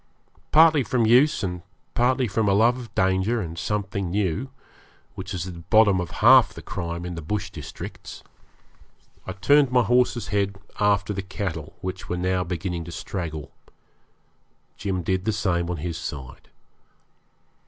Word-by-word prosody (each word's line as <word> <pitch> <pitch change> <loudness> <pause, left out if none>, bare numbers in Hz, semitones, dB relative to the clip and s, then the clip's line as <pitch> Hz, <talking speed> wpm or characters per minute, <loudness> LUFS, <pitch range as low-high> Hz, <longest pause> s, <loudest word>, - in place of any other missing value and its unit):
Partly 155 -1 +6
from 120 -1 +1
use, 125 +4 +4
and 90 -2 -3 0.3
partly 130 +1 +2
from 105 0 0
a - - +3
love 115 +4 +4
of 120 -2 -11
danger 95 +4 +1
and 85 -5 -5
something 100 -1 -2
new, 100 +6 -1 0.6
which 95 +1 -7
is 90 -3 -3
at 95 - -6
the 85 - -10
bottom 105 +2 +4
of 90 - -5 0.2
half - - +7
the - - -9
crime 85 +1 -4
in 90 - -5
the 85 - -6
bush 100 +6 -3
districts, 75 -5 -9 1.0
I 95 - -4
turned 140 +7 +4
my 125 -1 +4
horse's 120 -1 +1
head 100 -1 0 0.2
after 105 0 +2
the 100 - -3
cattle, 95 -5 -5
which 95 0 -6
were 90 - -1
now 90 +1 0
beginning 90 0 -4
to 85 - -8
straggle. 80 -4 -5 1.2
Jim 95 -3 -3
did 95 +2 -1
the 110 - +2
same 85 -5 0
on 90 - -2
his 85 +1 -4
side. 65 -7 -8
95 Hz, 160 wpm, -24 LUFS, 90-110 Hz, 1.2 s, half